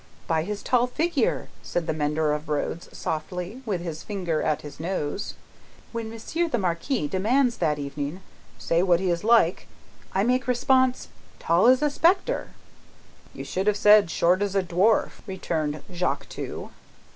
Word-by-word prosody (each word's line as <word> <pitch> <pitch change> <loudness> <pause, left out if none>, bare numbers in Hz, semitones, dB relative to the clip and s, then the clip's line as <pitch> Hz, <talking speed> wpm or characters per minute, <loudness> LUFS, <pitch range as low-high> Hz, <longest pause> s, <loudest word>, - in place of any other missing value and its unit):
"By 160 -1 +1
his 205 +5 -5
tall 250 -1 +2
figure," 305 0 0
said 175 - -2
the - - -1
mender 150 0 0
of 150 +1 -5
roads, 155 +3 -2
softly, 180 +3 -4
and 255 +2 -13
with 190 -5 -1
his 165 -3 -5
finger 180 -6 -2
at 155 - 0
his 145 -1 -10
nose. 175 +2 -3 0.6
"When 230 -1 -4
Monsieur 270 +10 -2
the 245 - 0
Marquis 180 - -1
demands 235 - +1
that 150 -1 +1
evening, 145 +4 -5 0.4
'Say, 165 +1 +1
what 180 -2 +3
is 175 -3 0
he 215 - -5
like?' 225 -7 +4 0.4
I 195 - +1
make 250 +3 +1
response, 255 +1 +2 0.3
'Tall 170 +6 +3
as 260 +3 +5
a 295 - +2
spectre.'" 345 +6 +2 0.9
"You - - -6
should 190 +2 -3
have 210 -1 +3
said, 210 -2 +6
short 175 +4 +2
as 200 -1 -1
a 195 - +3
dwarf," 185 +5 +2
returned 155 -6 -3
Jacques 180 +1 -1
Two. - - -6
190 Hz, 165 wpm, -25 LUFS, 165-235 Hz, 0.9 s, said